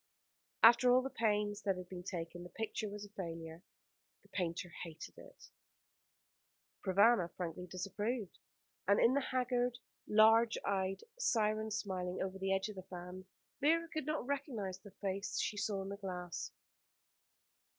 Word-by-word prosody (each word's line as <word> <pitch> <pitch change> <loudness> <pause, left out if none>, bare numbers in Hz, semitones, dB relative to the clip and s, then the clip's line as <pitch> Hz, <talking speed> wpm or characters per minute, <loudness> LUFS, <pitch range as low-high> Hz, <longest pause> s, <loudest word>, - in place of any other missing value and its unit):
After 240 +2 +8
all 255 +1 +5
the 270 - -3
pains 210 -2 +1
that 195 -3 0
had 180 -1 -7
been 180 -1 -7
taken, 175 -1 -5
the 175 - -8
picture 220 0 -3
was 205 0 -6
a - - -13
failure. 165 -4 -6 0.6
The - - -23
painter 175 -1 -2
hated 165 -2 -8
it, - - -15 1.3
Provana 200 -1 +5
frankly 180 0 -4
disapproved; 200 +4 -3 0.5
and 200 +1 +5
in 235 - +5
the 280 - +3
haggard, 250 -2 0 0.3
large 225 +2 +6
eyed 195 -1 0 0.2
siren 220 - +2
smiling 185 -4 -2
over 190 0 -3
the 195 0 0
edge 195 +1 +1
of 210 -2 -8
the - - -4
fan, 180 +1 -7 0.3
Vera 330 +4 +3
could 310 -3 -4
not 305 -5 -1
recognise 245 - -3
the 205 - -12
face 195 0 -3
she - - 0
saw 200 -2 -1
in 195 - -6
the 200 - -5
glass. 180 -3 -5
200 Hz, 150 wpm, -36 LUFS, 185-230 Hz, 1.3 s, After